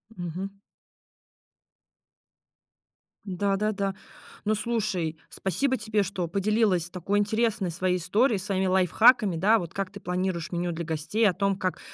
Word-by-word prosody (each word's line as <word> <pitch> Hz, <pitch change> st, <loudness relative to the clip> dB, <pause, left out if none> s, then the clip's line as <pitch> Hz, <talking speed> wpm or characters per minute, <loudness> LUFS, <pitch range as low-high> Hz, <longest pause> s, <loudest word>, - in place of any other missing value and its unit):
Мгм. 185 Hz, +3 st, -6 dB, 2.7 s
Да 195 Hz, +1 st, 0 dB
да 215 Hz, +1 st, +1 dB
да. 195 Hz, -1 st, -2 dB, 0.5 s
Ну 215 Hz, +1 st, +2 dB
слушай, 200 Hz, -8 st, -1 dB
спасибо 255 Hz, -, -1 dB
тебе, 215 Hz, -4 st, 0 dB
что 185 Hz, -2 st, -3 dB
поделилась 200 Hz, -2 st, +1 dB
такой 190 Hz, +3 st, -1 dB
интересной 215 Hz, -3 st, 0 dB
своей 180 Hz, +1 st, 0 dB
историей, 215 Hz, +6 st, +2 dB
своими 190 Hz, -1 st, -1 dB
лайфхаками, 190 Hz, +2 st, +4 dB
да, 210 Hz, +7 st, +4 dB
вот 170 Hz, -2 st, -7 dB
как 195 Hz, -1 st, -3 dB
ты 200 Hz, -, -9 dB
планируешь 180 Hz, -2 st, -2 dB
меню 175 Hz, 0 st, -1 dB
для 170 Hz, 0 st, -4 dB
гостей 165 Hz, +8 st, +1 dB
о -, -, -1 dB
том, 195 Hz, +1 st, 0 dB
как 185 Hz, -2 st, -2 dB
195 Hz, 135 wpm, -27 LUFS, 180-210 Hz, 2.7 s, лайфхаками